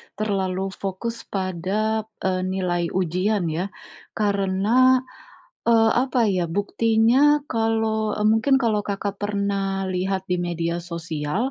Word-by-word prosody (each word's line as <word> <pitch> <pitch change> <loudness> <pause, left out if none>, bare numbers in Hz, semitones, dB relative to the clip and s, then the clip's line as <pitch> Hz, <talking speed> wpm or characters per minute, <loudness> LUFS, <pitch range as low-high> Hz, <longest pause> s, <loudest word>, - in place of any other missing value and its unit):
terlalu 195 -2 -1
fokus 200 +5 -5
pada, 200 +4 -1 0.2
eee, 185 -1 0
nilai 180 -2 -1
ujian 185 +1 0
ya. 175 +5 -2 0.5
Karena, 210 +5 +3 0.7
eee, 225 -1 +5
apa 250 -1 +2
ya, 180 -2 0
buktinya 230 - +3
kalau, 220 -1 0
eee, 210 - -1
mungkin 245 +5 +3
kalau 215 -3 +2
Kakak 200 0 -3
pernah 200 -1 -1
lihat 190 +1 -1
di 180 - +1
media 170 -1 -2
sosial, 170 - -3
200 Hz, 115 wpm, -23 LUFS, 185-225 Hz, 0.7 s, eee